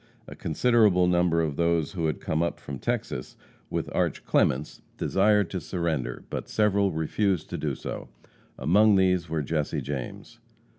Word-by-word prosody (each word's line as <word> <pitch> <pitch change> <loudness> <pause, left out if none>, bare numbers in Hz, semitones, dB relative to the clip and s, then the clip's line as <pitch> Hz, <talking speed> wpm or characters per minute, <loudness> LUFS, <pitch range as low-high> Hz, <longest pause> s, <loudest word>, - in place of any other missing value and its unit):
A - - -9
considerable 105 +1 +3
number 85 -2 +2
of 75 -3 -2
those 85 -2 +1
who 85 -4 -1
had 75 - -2
come 80 +1 -1
up 85 - -1
from 70 -2 -7
Texas 65 - -3 0.3
with - - -2
Arch. - - -1
Clements 70 +4 +1 0.2
desired 105 -1 +2
to 95 - -2
surrender, 80 -7 -3
but - - -4
several 100 -2 +2
refused 90 +3 -1
to - - -2
do - - -2
so. - - -7 0.5
Among 100 +10 +4
these 90 -3 +2
were 80 -2 -1
Jesse 75 0 -1
James. 65 -1 -6
85 Hz, 155 wpm, -26 LUFS, 75-95 Hz, 0.5 s, Among